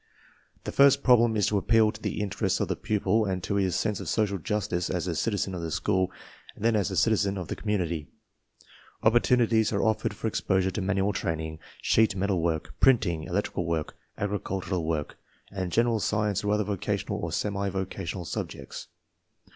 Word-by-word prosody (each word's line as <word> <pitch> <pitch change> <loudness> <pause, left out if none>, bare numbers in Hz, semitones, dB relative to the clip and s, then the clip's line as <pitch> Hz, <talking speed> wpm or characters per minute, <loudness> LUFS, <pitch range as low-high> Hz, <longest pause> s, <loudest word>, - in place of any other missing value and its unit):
The - - -4
first 140 0 +5
problem 120 -3 +5
is 105 - +3
to 105 - +2
appeal 110 +1 +4
to 110 0 -12
the - - -2
interests""] 100 -1 -1
of - - -1
the - - 0
pupil 105 +1 +1
and 95 -2 -2
to 100 - -2
his 95 -3 +1
sense 105 -4 0
of - - -5
social 100 -3 0
justice 90 -1 -1
as 90 -2 -1
a 90 - -1
citizen 100 +2 -1
of 90 - -4
the 85 - -3
school 95 +2 0 0.4
and 110 - -6
then 115 -1 +4
as 105 -1 +1
a 95 - -4
citizen 100 -2 +2
of 90 -3 -5
the - - -2
community. 85 -8 -2 1.0
Opportunities 115 -1 +3
are 100 - 0
offered 110 -1 0
for - - -7
exposure 95 -3 +1
to 105 - -3
manual 100 +1 +1
train 85 -4 -2
ing, 80 0 -6 0.2
sheet 110 -3 +3
metal 95 -2 0
work, 80 -2 -1
printing, 105 -12 +3
electrical 90 -2 -2
work, 80 -2 -2 0.2
agri 105 0 -1
j - - -26
cultural 95 -2 -2
work, 80 -2 -2 0.3
and 95 -2 -3
general 115 +1 +2
science 105 0 0
or 105 - 0
other 105 0 +2
vocational 100 -2 -2
or - - -3
semi 100 -1 -1
vocational 95 -1 -4
subjects. - - -6
100 Hz, 190 wpm, -27 LUFS, 90-110 Hz, 1.0 s, first